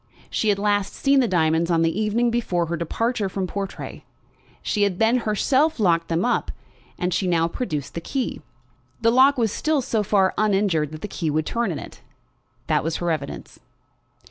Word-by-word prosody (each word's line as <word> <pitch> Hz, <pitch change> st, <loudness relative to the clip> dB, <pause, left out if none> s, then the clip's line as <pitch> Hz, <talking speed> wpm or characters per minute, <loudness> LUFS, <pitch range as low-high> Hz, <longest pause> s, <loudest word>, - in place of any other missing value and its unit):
She 220 Hz, -, 0 dB
had 200 Hz, -, +3 dB
last 205 Hz, -1 st, 0 dB
seen 275 Hz, 0 st, +3 dB
the 250 Hz, -, +3 dB
diamonds 165 Hz, -2 st, +2 dB
on 165 Hz, -1 st, +3 dB
the 165 Hz, +6 st, 0 dB
evening 230 Hz, +3 st, +1 dB
before 185 Hz, -7 st, 0 dB
her 170 Hz, +1 st, -2 dB
departure 210 Hz, +6 st, -1 dB
from 190 Hz, 0 st, -2 dB
Portray. 195 Hz, +1 st, -6 dB, 0.6 s
She 210 Hz, -, -1 dB
had 200 Hz, -3 st, +2 dB
then 225 Hz, +4 st, +3 dB
herself 275 Hz, +8 st, +2 dB
locked 170 Hz, -5 st, +2 dB
them 165 Hz, +4 st, 0 dB
up, 245 Hz, -, 0 dB, 0.5 s
and 180 Hz, 0 st, -1 dB
she 185 Hz, -, 0 dB
now 165 Hz, -2 st, +2 dB
produced 160 Hz, -, -4 dB
the 170 Hz, -, -4 dB
key. 260 Hz, +9 st, -3 dB, 0.6 s
The 230 Hz, 0 st, +4 dB
lock 265 Hz, +3 st, +5 dB
was 225 Hz, -4 st, +1 dB
still 310 Hz, +5 st, 0 dB
so 230 Hz, -4 st, 0 dB
far 195 Hz, -2 st, +2 dB
uninjured 195 Hz, -8 st, +1 dB
that 155 Hz, -, -8 dB
the -, -, -4 dB
key 170 Hz, -5 st, -3 dB
would 155 Hz, +1 st, 0 dB
turn 235 Hz, +6 st, -1 dB
it. -, -, -9 dB, 0.6 s
That -, -, +1 dB
was 165 Hz, 0 st, -2 dB
her 175 Hz, -1 st, -1 dB
evidence. 150 Hz, -3 st, -5 dB
200 Hz, 185 wpm, -23 LUFS, 170-230 Hz, 0.6 s, lock